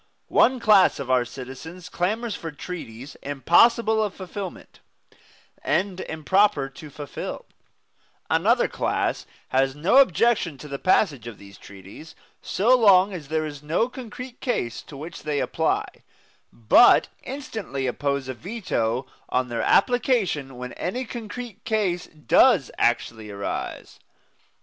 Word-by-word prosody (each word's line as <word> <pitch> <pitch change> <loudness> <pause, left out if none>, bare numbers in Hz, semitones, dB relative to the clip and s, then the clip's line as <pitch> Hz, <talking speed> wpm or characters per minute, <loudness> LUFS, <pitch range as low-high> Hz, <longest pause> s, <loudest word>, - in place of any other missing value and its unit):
One 255 0 +4
class 210 -5 +5
of 130 -2 -4
our 130 -1 +4
citizens 135 +8 -9
clamors 215 +6 -2
for 165 - -6
treaties 145 -5 -8
impossible 220 - +3
of 205 -2 -3
fulfilment, 190 0 -8 0.8
and 190 -1 0
improper 160 -3 +1
to 150 +3 -12
fulfil; 145 0 -7 0.8
another - - +3
class - - -2 0.2
has 135 +1 +1
no 165 - +2
objection 230 - +3
to 140 - -10
the 140 -1 -5
passage 145 - +2
of 115 -4 -8
these 100 0 -14
treaties 100 - -13 0.3
so 235 +7 +3
long 200 -4 +5
as 160 -6 -7
there 155 +1 -1
is 145 -2 -7
no 160 +10 0
concrete 250 0 -9
case 240 - -2
to 140 - -12
which 165 +4 -8
they 150 -2 -2
apply, - - 0 0.7
but 115 - +5
instantly 220 - -5
oppose 140 +1 -2
a 130 - -3
veto 130 - -2 0.2
on 125 0 0
their 120 -1 -2
application 200 - +1
when 125 0 -7
any 250 +9 -3
concrete 230 -1 -8
case 195 -6 -1
does 165 - +3
actually 115 -2 0
arise. 100 0 -5
165 Hz, 130 wpm, -24 LUFS, 135-215 Hz, 0.8 s, class